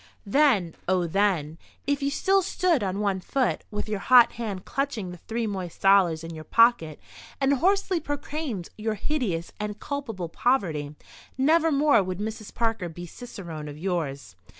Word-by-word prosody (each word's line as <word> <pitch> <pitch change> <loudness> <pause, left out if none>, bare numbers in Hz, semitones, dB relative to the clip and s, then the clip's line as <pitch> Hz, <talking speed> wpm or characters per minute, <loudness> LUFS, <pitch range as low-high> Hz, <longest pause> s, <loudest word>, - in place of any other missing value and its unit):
Then—oh, 195 - +2
then—if 190 - -1
you 280 - +1
still 385 +7 +2
stood 355 -5 +1
on 195 0 -2
one 200 -2 0
foot, 260 +6 -1
with 210 0 -4
your 210 -2 -2
hot 240 +1 +6
hand 205 -6 -5
clutching 255 -10 -2
the 180 - -10
three 230 +4 -3
moist 190 -5 -5
dollars 190 -5 +4
in 165 0 -7
your 155 -1 -8
pocket, 230 -7 +3 0.4
and 275 0 +3
hoarsely 385 +1 +2
proclaimed 290 - -4
your 220 0 -1
hideous 205 - -2
and 210 0 -4
culpable 245 - -4
poverty, 160 - 0 0.4
nevermore 300 -3 +4
would 185 -1 -3
Mrs. 215 +1 -5
Parker 225 -6 -1
be 175 +2 -8
cicerone 170 -7 -8
of 145 0 -8
yours. 155 - -3
210 Hz, 150 wpm, -26 LUFS, 175-275 Hz, 0.4 s, hot